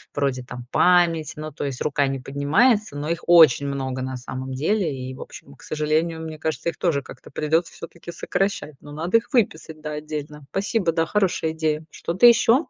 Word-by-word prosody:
вроде 135 -3 0
там 125 -1 -9
память. 170 -4 +3
Ну, 155 0 -6
то 145 - -6
есть 135 -3 -4
рука 145 -1 +1
не 135 0 -2
поднимается, 145 - +2
но 145 +1 -4
их 170 - -2
очень 160 -4 +7
много, 130 -2 -3
на 130 0 -4
самом 130 +1 -6
деле. 185 +11 +1
И, 135 -8 -3
в - - -10
общем, 70 - -11
к - - -21
сожалению, 155 +2 -1
мне 160 -1 -7
кажется, 160 +1 -2
их - - -7
тоже 160 -6 +1
как-то 125 - -13
придется 160 +4 0
все-таки 170 0 -10
сокращать. 195 -7 -2
Но 145 - -12
надо 170 +8 +2
их 230 - -4
выписать, 160 -9 0
да, 150 - -5
отдельно. 150 -1 -6
Пасибо, 195 -2 0
да, 165 -1 +1
хорошая 185 -5 0
идея. 160 -1 -1
Что-то 175 +8 +1
еще? 240 +4 +5
155 Hz, 195 wpm, -23 LUFS, 140-170 Hz, -, очень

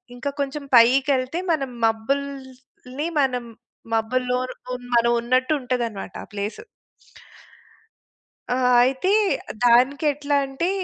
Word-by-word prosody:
ఇంకా 255 +3 -3
కొంచెం 280 +1 -4
పైకెళ్తే 260 +5 +3
మనం 275 -5 -1 0.2
మబ్బుల్ని 260 +3 -4
మనం 250 -3 -1 0.5
మబ్బుల్లోను 250 +3 -1 0.2
హ్మ్ 250 0 -6
మనం 235 0 +4
ఉన్నట్టు 255 +3 +1
ఉంటదనమాట 235 -7 -3
ఆ - - -14
ప్లేసు. 205 - -5 1.9
ఆ! - - -1 0.3
అయితే 265 +9 +1 0.5
దానికి 255 +5 +4
ఎట్లా 285 0 -2
అంటే, 270 +6 -2
255 Hz, 100 wpm, -23 LUFS, 240-275 Hz, 1.9 s, మనం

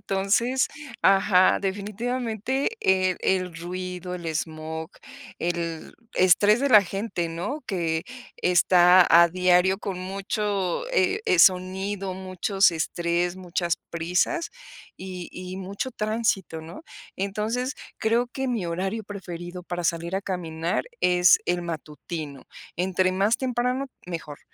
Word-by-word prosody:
Entonces, 215 +7 +1 0.4
ajá, 195 -1 +5
definitivamente 225 - -2
el 185 -1 +2
el 185 -2 0
ruido, 180 +1 -5
el 170 -2 -7
esmog, 160 0 -4 0.5
el 170 -2 -3 0.2
estrés 205 +5 +5
de 280 -1 +1
la 210 -3 +9
gente, 195 -2 -3
¿no?, 190 - -4
que 165 -4 -1 0.3
está 180 0 +5
a 170 +1 +7
diario 180 +2 +3
con 195 -3 -4
mucho, 195 - -2
eh, 390 -3 +2
eh, 180 - +3
sonido, 190 +2 +2
muchos 190 +1 +2
estrés, 170 +2 -1
muchas 175 -2 -1
prisas. 180 - 0 0.5
Y 185 -2 -7
y 185 +1 -7
mucho 195 +7 -4
tránsito, 215 -7 -1
¿no?, 170 - -10 0.3
entonces, 215 +7 -2 0.2
creo 230 +3 +2
que 265 +1 -3
mi 230 -6 -1
horario 190 +6 -3
preferido 180 -3 -7
para 175 0 -5
salir 170 +2 -1
a 195 - -3
caminar 170 -3 -2 0.2
es 180 0 +5
el 175 0 0
matutino. 155 -3 -6 0.3
Entre 185 +1 +1
más 200 +5 +2
temprano, 250 +1 -1 0.2
mejor. 165 -4 -6
185 Hz, 120 wpm, -25 LUFS, 175-205 Hz, 0.5 s, la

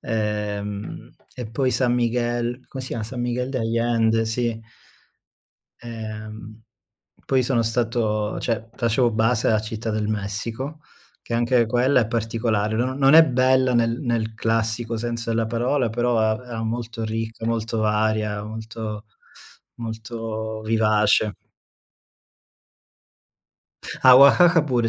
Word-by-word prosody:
ehm, 105 -2 -4 0.2
e 125 -3 -6
poi 130 +2 0
San 125 -2 +1
Miguel, 120 +1 -1
come 135 -1 -7
si 130 - -7
chiama, 115 - -3
San 120 +2 -6
Miguel 125 +1 -2
de 130 - -2
Allende, 115 0 +1
sì. 115 0 -2 1.2
Ehm, 110 -1 -8 0.6
poi 130 -1 +2
sono 120 -2 +1
stato 110 -2 -1
cioè 115 -1 -2
facevo 120 0 +1
base 110 +1 +1
a 110 - +3
Città 110 +1 -5
del 105 0 -1
Messico, 110 +8 -4 0.4
che - - -9
anche 120 +1 +3
quella 125 +3 +3
è 115 - 0
particolare. 110 -2 -1
No 130 +2 0
non 135 +1 +4
è 160 0 +9
bella 130 -1 +2
nel 115 0 +1
nel 115 -3 -1
classico 115 +1 -1
senso 115 0 -3
della 115 0 0
parola, 120 +2 0
però 120 +1 0
a 110 0 +2
era 115 -2 -5
molto 115 0 -4
ricca, 115 +1 -4
molto 115 0 -1
varia, 105 -1 0
molto 110 -1 -7 0.7
molto 110 -1 -5
vivace. 110 -1 +2 2.7
A 130 -1 +9
Oaxaca 165 +5 +7
pure 120 -5 0
115 Hz, 125 wpm, -23 LUFS, 110-120 Hz, 2.7 s, è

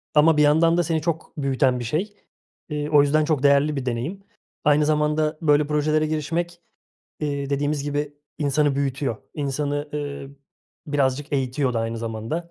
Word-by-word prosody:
ama 150 +1 +5
bir 150 - +5
yandan 165 +3 +4
da 175 - +3
seni 160 -1 -1
çok 165 0 -3
büyüten 135 -2 +1
bir 120 - -4
şey. 170 - -2 0.6
Eee, 150 0 -3
o 150 -2 +6
yüzden 150 +2 +2
çok 150 -3 0
değerli 140 +1 +4
bir 135 -2 -3
deneyim. 135 +12 -3 0.4
Aynı 150 0 +4
zamanda 150 +1 +1
böyle 150 -2 +3
projelere 155 +1 +1
girişmek, 170 +3 -2 0.6
iii, 140 -2 -2
dediğimiz 145 +1 0
gibi 145 0 -3 0.2
insanı 145 -1 +2
büyütüyor, 140 -3 -1 0.2
insanı, 145 0 -2
ııı, 140 -2 -5 0.6
birazcık 145 0 0
eğitiyor 130 -1 0
da 115 - +1
aynı 115 0 -3
zamanda. 115 +10 -4
145 Hz, 160 wpm, -23 LUFS, 140-155 Hz, 0.6 s, o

